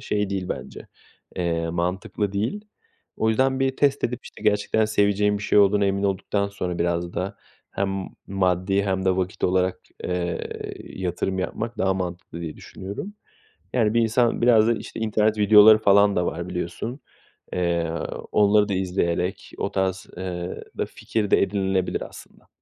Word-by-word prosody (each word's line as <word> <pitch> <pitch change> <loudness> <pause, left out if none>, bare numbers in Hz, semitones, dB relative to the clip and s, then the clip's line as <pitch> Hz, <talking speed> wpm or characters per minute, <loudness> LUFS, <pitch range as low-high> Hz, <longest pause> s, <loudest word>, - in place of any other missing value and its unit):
şey 105 -1 -1
değil 95 -2 -2
bence, - - -6 0.5
eee, 85 -2 -1
mantıklı 90 +4 -2
değil. 115 - -2 0.5
O 110 - +1
yüzden 130 +4 +2
bir 135 0 +1
test 140 -1 +2
edip 125 0 -2
işte - - -12
gerçekten 105 +1 +2
seveceğim 105 -1 +2
bir - - -8
şey 105 - +3
olduğuna 100 0 +5
emin 100 0 0
olduktan 100 +1 0
sonra 90 -3 -4
biraz 85 0 -1
da 95 +2 -3 0.3
hem 95 -1 -2 0.2
maddi 95 +1 +1
hem 95 -1 -1
de 95 -1 +2
vakit 95 +1 -2
olarak, 90 0 +1 0.3
ııı, 90 -2 -1 0.5
yatırım 95 +1 -3
yapmak 115 +5 -3
daha 95 0 +2
mantıklı 90 -2 -5
diye 80 -2 -6
düşünüyorum. 100 - -7 0.6
Yani, 110 -4 +2
bir 115 - +4
insan 115 +1 +2
biraz 115 -2 +5
da 115 - +4
işte 115 - -7
internet 110 0 +1
videoları 105 +1 +8
falan 100 -1 +4
da 90 - +1
var 85 +1 -3
biliyorsun. 90 - -4 0.5
Eee, 85 -2 0 0.4
onları 105 0 +4
da - - 0
izleyerek 90 -1 -1
o 100 - -2
tarz, 95 -1 -1
ııı, 90 -1 -4 0.2
da - - 0
fikir 105 -3 -3
de - - +5
edinilebilir 95 -1 0
aslında. - - -15
100 Hz, 155 wpm, -24 LUFS, 90-105 Hz, 0.6 s, videoları